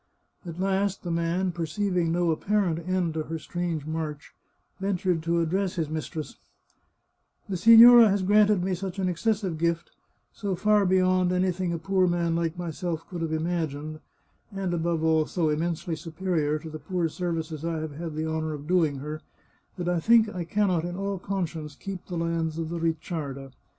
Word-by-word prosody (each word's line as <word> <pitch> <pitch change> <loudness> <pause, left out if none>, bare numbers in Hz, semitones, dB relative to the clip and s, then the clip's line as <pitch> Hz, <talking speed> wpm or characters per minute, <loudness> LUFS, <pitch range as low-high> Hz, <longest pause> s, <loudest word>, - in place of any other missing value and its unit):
At 170 +1 -7
last 195 +1 0
the 175 - -3
man, 170 +2 0
perceiving 175 +1 -1
no 175 0 +2
apparent 185 0 0
end 180 -3 0
to 160 - -2
her 160 +1 -4
strange 165 -2 -3
march, 155 -1 -5 0.5
ventured 185 -3 0
to 170 +1 +1
address 185 +3 0
his 160 -4 -2
mistress: 155 -2 -5 0.5
" - - -42
The 195 - -1
signora 230 +4 +9
has 195 -1 +1
granted 205 -1 +4
me 190 0 0
such 185 +1 -4
an 190 -1 0
excessive 190 -2 -1
gift, 170 0 -1 0.4
so 200 -3 -3
far 210 +1 +3
beyond 185 -1 +3
anything 180 -1 0
a 170 - -1
poor 185 +3 +1
man 170 -1 0
like 165 0 -1
myself 170 -1 -4
could 175 -3 -5
have 165 -1 -2
im 160 0 -1
agined, 155 -3 -3 0.5
and 195 -3 -3
above 165 -1 -1
all 160 -1 +3
so 165 -4 0
immensely 165 +2 -1
superior 160 -1 -1
to 160 +1 -8
the 155 - -7
poor 170 +3 -1
serv 170 +1 -3
ices 160 -1 -5
I 165 -1 -1
have 155 -1 -4
had 160 +1 -6
the 155 +1 -2
honour 160 0 -2
of 145 0 -9
doing 165 -4 +2
her, 150 +3 -6 0.6
that 175 -1 -3
I 175 -1 +1
think 225 +4 +5
I 180 -4 -5
can 205 +3 +1
not, 170 -3 +1
in 175 0 -4
all 195 0 -3
conscience, 165 -6 -4
keep 195 +2 -7
the 175 - -4
lands 165 -1 -1
of 165 -1 -3
the 170 0 -3
Ricciarda. 155 -4 -3
170 Hz, 185 wpm, -26 LUFS, 160-185 Hz, 0.6 s, signora